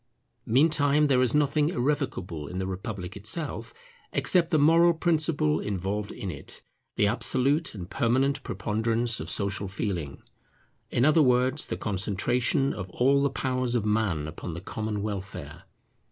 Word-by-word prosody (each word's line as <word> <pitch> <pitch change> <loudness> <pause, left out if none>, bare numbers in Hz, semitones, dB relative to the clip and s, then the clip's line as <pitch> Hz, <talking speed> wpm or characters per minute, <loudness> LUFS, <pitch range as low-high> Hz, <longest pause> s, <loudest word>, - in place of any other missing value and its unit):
Meantime 145 +3 +3
there 130 -3 +3
is 125 +1 +2
nothing 150 +1 +2
irrevocable 120 - -2
in 90 - -6
the 95 - -2
republic 95 -1 -5
itself, 115 +2 -2 0.4
except 170 -2 +2
the 160 - +2
moral 165 +3 +5
principle 155 -2 +1
involved 100 +1 -3
in 95 - -5
it, - - -10 0.3
the - - +3
absolute 130 +7 +1
and 90 -3 -8
permanent 135 +2 +1
preponderance 115 +1 0
of - - -6
Social 100 0 -1
Feeling; 95 -7 -4 0.7
in 120 - +2
other 155 +2 +5
words, 130 +1 +2
the - - -3
concentration 120 - 0
of 95 -3 -6
all 135 +8 +2
the 140 - +2
powers 130 -2 -1
of 115 -3 0
Man 105 -8 0
upon 80 +1 -7
the 85 - -6
common 105 +1 -4
welfare. 95 -5 -6
115 Hz, 145 wpm, -27 LUFS, 100-140 Hz, 0.7 s, moral